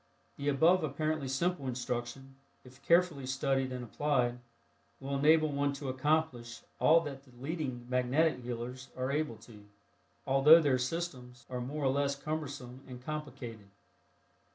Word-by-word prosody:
The 145 Hz, 0 st, -1 dB
above 160 Hz, +5 st, +4 dB
apparently 155 Hz, 0 st, -1 dB
simple 140 Hz, +2 st, -1 dB
instruction, 125 Hz, +1 st, -4 dB, 0.3 s
if 130 Hz, +1 st, -16 dB
carefully 170 Hz, -6 st, +3 dB
studied 135 Hz, -1 st, 0 dB
and 125 Hz, -1 st, -4 dB
applied, 125 Hz, -1 st, 0 dB, 0.6 s
will 140 Hz, +1 st, -3 dB
enable 155 Hz, +2 st, +4 dB
one 140 Hz, 0 st, 0 dB
to 140 Hz, -1 st, -5 dB
accomplish 130 Hz, -4 st, -1 dB, 0.2 s
all 165 Hz, +1 st, +6 dB
that 140 Hz, -4 st, -6 dB
the 135 Hz, -, -20 dB
leading 135 Hz, -4 st, -4 dB
"magnetic 125 Hz, +4 st, +2 dB
healers" 125 Hz, +2 st, -6 dB
are 130 Hz, +1 st, -1 dB
able 150 Hz, -4 st, -1 dB
to, 105 Hz, -3 st, -14 dB, 0.6 s
although 135 Hz, +5 st, +7 dB
their 140 Hz, -5 st, +2 dB
"systems" 125 Hz, -4 st, -4 dB
are 125 Hz, -1 st, -3 dB
more 140 Hz, +4 st, -3 dB
or -, -, +4 dB
less 140 Hz, +1 st, +1 dB
cumbersome 140 Hz, -4 st, -5 dB
and 125 Hz, -1 st, -10 dB
complicated. 125 Hz, -8 st, -6 dB
135 Hz, 140 wpm, -32 LUFS, 125-150 Hz, 0.6 s, although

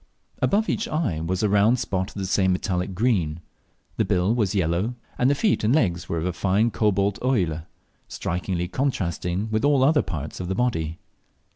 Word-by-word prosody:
Above 215 Hz, +3 st, +2 dB
each 225 Hz, -, -1 dB
eye 145 Hz, -, -1 dB
was 90 Hz, +5 st, -2 dB
a -, -, +4 dB
round 105 Hz, +4 st, +4 dB
spot 95 Hz, -5 st, -2 dB
of -, -, -16 dB
the 100 Hz, -2 st, -3 dB
same 95 Hz, 0 st, +2 dB
metallic 90 Hz, 0 st, -2 dB
green; 90 Hz, -8 st, +1 dB, 0.6 s
the -, -, +3 dB
bill 90 Hz, +4 st, +1 dB
was 105 Hz, -4 st, 0 dB
yellow, 95 Hz, +6 st, 0 dB, 0.2 s
and 125 Hz, -, +4 dB
the 145 Hz, -, +3 dB
feet 205 Hz, -, +1 dB
and 115 Hz, +6 st, +3 dB
legs 90 Hz, -, 0 dB
were 85 Hz, -, -1 dB
of 80 Hz, -, -2 dB
a 90 Hz, -, -1 dB
fine 100 Hz, +6 st, +1 dB
cobalt 100 Hz, -2 st, +1 dB
óille, 90 Hz, -, 0 dB, 0.4 s
strikingly 90 Hz, 0 st, -3 dB
contrasting 95 Hz, -, -1 dB
with 110 Hz, 0 st, 0 dB
all 145 Hz, -2 st, +4 dB
the -, -, +5 dB
other 150 Hz, +1 st, +4 dB
parts 75 Hz, -4 st, -5 dB
of 90 Hz, -, -4 dB
the 95 Hz, -, -1 dB
body. 85 Hz, -10 st, -1 dB
95 Hz, 190 wpm, -24 LUFS, 90-120 Hz, 0.6 s, the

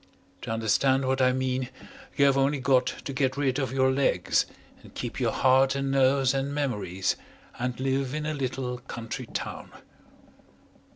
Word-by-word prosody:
To -, -, -7 dB
understand 130 Hz, +4 st, +2 dB
what 130 Hz, 0 st, +1 dB
I 130 Hz, 0 st, +5 dB
mean 130 Hz, 0 st, -1 dB, 0.5 s
you 140 Hz, -, +5 dB
have 140 Hz, -1 st, +4 dB
only 135 Hz, +1 st, +2 dB
got 130 Hz, -1 st, +3 dB
to 140 Hz, -, -5 dB
get 130 Hz, 0 st, 0 dB
rid 140 Hz, -1 st, +1 dB
of 135 Hz, -2 st, -1 dB
your 130 Hz, 0 st, +3 dB
legs 130 Hz, -10 st, +1 dB, 0.3 s
and -, -, -16 dB
keep -, -, -5 dB
your -, -, +1 dB
heart 135 Hz, +1 st, +4 dB
and 135 Hz, 0 st, -1 dB
nerves 135 Hz, 0 st, +3 dB
and 135 Hz, +1 st, -1 dB
memories, 105 Hz, -10 st, -1 dB, 0.4 s
and 125 Hz, 0 st, -2 dB
live 135 Hz, +1 st, -1 dB
in 150 Hz, 0 st, -3 dB
a 155 Hz, -, -1 dB
little 130 Hz, -3 st, -3 dB
country 120 Hz, -3 st, -6 dB
town. -, -, -5 dB
130 Hz, 165 wpm, -27 LUFS, 125-135 Hz, 0.5 s, I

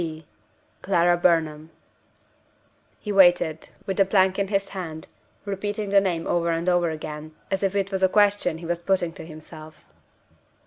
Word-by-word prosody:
"C. 160 Hz, -2 st, -5 dB
B. -, -, -28 dB, 0.6 s
Clara 175 Hz, -2 st, +3 dB
Burnham." 160 Hz, -3 st, +1 dB, 1.3 s
He 210 Hz, -, -5 dB
waited, 175 Hz, -5 st, +3 dB, 0.2 s
with 195 Hz, -, -3 dB
the 195 Hz, -, +6 dB
plank 190 Hz, 0 st, +2 dB
in 200 Hz, -, 0 dB
his 195 Hz, 0 st, -1 dB
hand; 165 Hz, -5 st, -7 dB, 0.4 s
repeating 205 Hz, +1 st, -3 dB
the 200 Hz, 0 st, +6 dB
name 175 Hz, -4 st, -2 dB
over 170 Hz, -1 st, 0 dB
and 165 Hz, +1 st, -1 dB
over 175 Hz, -1 st, +2 dB
again, 155 Hz, 0 st, -7 dB, 0.2 s
as 195 Hz, -, 0 dB
if 195 Hz, 0 st, 0 dB
it 195 Hz, 0 st, -1 dB
was 190 Hz, -1 st, -2 dB
a 190 Hz, -, +4 dB
question 205 Hz, -5 st, +2 dB
he 170 Hz, -, -10 dB
was 170 Hz, 0 st, -2 dB
putting 175 Hz, -2 st, 0 dB
to -, -, -9 dB
himself. 155 Hz, 0 st, -12 dB
175 Hz, 170 wpm, -24 LUFS, 160-195 Hz, 1.3 s, the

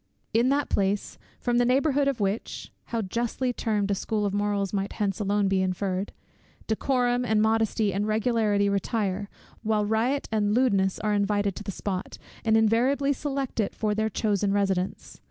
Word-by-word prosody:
In 235 Hz, +3 st, +3 dB
that 285 Hz, +1 st, +1 dB
place, 200 Hz, +1 st, -1 dB, 0.2 s
from 240 Hz, 0 st, +1 dB
the -, -, +4 dB
neighbourhood 275 Hz, +3 st, +2 dB
of 275 Hz, -4 st, 0 dB
which, 200 Hz, +2 st, -3 dB
(how 230 Hz, -2 st, -2 dB
justly 240 Hz, +5 st, -1 dB
termed 210 Hz, -4 st, -1 dB
a -, -, +3 dB
school 210 Hz, +2 st, -1 dB
of 200 Hz, -, -1 dB
morals 205 Hz, -1 st, 0 dB
might 195 Hz, 0 st, -2 dB
hence 200 Hz, -3 st, -1 dB
alone 205 Hz, 0 st, +1 dB
be 190 Hz, -1 st, +2 dB
inferred) 185 Hz, +1 st, -1 dB, 0.5 s
decorum, 245 Hz, +2 st, +1 dB
and 220 Hz, -3 st, +2 dB
modesty, 220 Hz, -1 st, +2 dB
and 205 Hz, +3 st, -1 dB
regularity 215 Hz, -2 st, +2 dB
retire, 200 Hz, 0 st, -1 dB, 0.3 s
while 215 Hz, -2 st, +1 dB
riot 230 Hz, +6 st, 0 dB
and 210 Hz, -1 st, +1 dB
lewdness 200 Hz, -7 st, +2 dB
are 210 Hz, 0 st, 0 dB
invited 205 Hz, -1 st, +1 dB
to -, -, -6 dB
the 200 Hz, -, -4 dB
spot, 190 Hz, 0 st, -4 dB, 0.3 s
and 220 Hz, -1 st, +4 dB
invariably 250 Hz, +6 st, +3 dB
select 275 Hz, -3 st, -3 dB
it 210 Hz, -, 0 dB
for 215 Hz, -1 st, 0 dB
their 220 Hz, +1 st, 0 dB
chosen 205 Hz, -1 st, 0 dB
residence! 195 Hz, -2 st, -1 dB
210 Hz, 170 wpm, -26 LUFS, 200-235 Hz, 0.5 s, the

